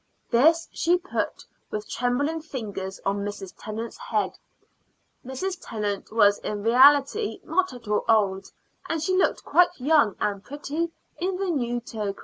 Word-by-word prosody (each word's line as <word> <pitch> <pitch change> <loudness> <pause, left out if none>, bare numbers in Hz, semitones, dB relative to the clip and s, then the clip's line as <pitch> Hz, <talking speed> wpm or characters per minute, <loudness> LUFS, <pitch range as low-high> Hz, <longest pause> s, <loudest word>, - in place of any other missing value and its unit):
This 320 +8 +4
she 345 +2 +2
put 365 +1 -4 0.2
with 210 0 -4
trembling 285 +7 -1
fingers 205 -10 -6
on 195 +1 +1
Mrs. 200 -2 -6
Tennant's 220 +2 -6
head. - - -2 0.8
Mrs. 350 +9 -4
Tennant 205 -3 -4
was 205 -2 +4
in 205 -1 -4
reality 280 - +5
not 370 +3 +1
at 245 -3 -11
all 210 0 +1
old, 195 -3 +2 0.4
and 325 - 0
she 370 +5 0
looked 375 - +1
quite 355 -2 +3
young 280 - +3
and 205 -1 -1
pretty 295 +4 -3 0.3
in 365 +1 -1
the 380 -1 -1
new 240 -5 -1
toque. 210 -4 -4
250 Hz, 145 wpm, -25 LUFS, 210-330 Hz, 0.8 s, reality